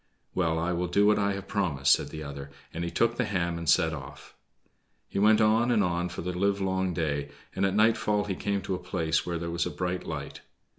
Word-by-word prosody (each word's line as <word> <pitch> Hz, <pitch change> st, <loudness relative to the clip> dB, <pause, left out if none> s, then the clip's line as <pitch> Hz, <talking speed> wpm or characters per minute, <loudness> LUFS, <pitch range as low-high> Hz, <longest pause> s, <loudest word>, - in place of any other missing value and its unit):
"Well, 85 Hz, -3 st, +1 dB
I 85 Hz, +2 st, 0 dB
will 90 Hz, +1 st, -1 dB
do 100 Hz, +4 st, +3 dB
what 105 Hz, 0 st, +4 dB
I 100 Hz, 0 st, +1 dB
have 100 Hz, 0 st, -6 dB
promised," 85 Hz, -10 st, +2 dB
said -, -, 0 dB
the 80 Hz, -1 st, -7 dB
other, 70 Hz, -1 st, -7 dB, 0.2 s
and 85 Hz, -, -3 dB
he 85 Hz, -, -2 dB
took 115 Hz, +5 st, +1 dB
the 125 Hz, -, +1 dB
ham 85 Hz, -5 st, -1 dB
and 85 Hz, -2 st, -2 dB
set 80 Hz, 0 st, +4 dB
off. 70 Hz, -2 st, -10 dB, 0.7 s
He -, -, -3 dB
went 105 Hz, +1 st, +5 dB
on 110 Hz, +2 st, +3 dB
and 110 Hz, -4 st, +3 dB
on 90 Hz, -1 st, -1 dB
for 90 Hz, -, -6 dB
the 90 Hz, +1 st, -3 dB
livelong 95 Hz, -1 st, 0 dB
day, 75 Hz, -4 st, -2 dB, 0.3 s
and 95 Hz, +1 st, +2 dB
at 95 Hz, -, -2 dB
nightfall 105 Hz, -1 st, +3 dB
he 100 Hz, -, -3 dB
came 100 Hz, +1 st, -2 dB
to 95 Hz, -, -2 dB
a 90 Hz, -, -2 dB
place 80 Hz, -2 st, -1 dB
where 85 Hz, -1 st, -1 dB
there 85 Hz, 0 st, -4 dB
was 85 Hz, 0 st, 0 dB
a -, -, -2 dB
bright 90 Hz, 0 st, -3 dB
light. -, -, -6 dB
90 Hz, 235 wpm, -28 LUFS, 85-100 Hz, 0.7 s, went